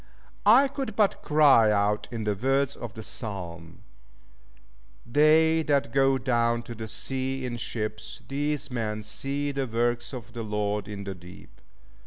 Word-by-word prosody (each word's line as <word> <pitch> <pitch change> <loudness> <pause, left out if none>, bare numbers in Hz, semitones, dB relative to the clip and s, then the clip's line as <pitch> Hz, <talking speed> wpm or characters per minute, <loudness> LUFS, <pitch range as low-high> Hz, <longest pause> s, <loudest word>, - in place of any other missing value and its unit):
I 255 +6 +7
could 265 -5 -5
but 210 -2 +2
cry 140 -8 +5
out 105 0 +1
in 115 -2 -4
the 105 -1 +1
words 135 +5 0
of 115 -4 -8
the 110 - -7
Psalm, 90 -7 -8 1.2
"They 155 +5 +4
that 140 -5 +1
go 135 0 +4
down 120 -2 +1
to 120 - -8
the 110 -1 -7
sea 130 +3 -3
in 120 -1 -4
ships, 110 -2 -5
these 145 +1 -2
men 110 -3 -3
see 140 +6 -3
the 135 -1 -2
works 120 +1 -1
of 125 -6 -8
the 120 - -5
Lord 105 -1 -2
in 100 -1 -6
the 100 -1 -5
deep. 90 0 -15
120 Hz, 155 wpm, -27 LUFS, 105-140 Hz, 1.2 s, I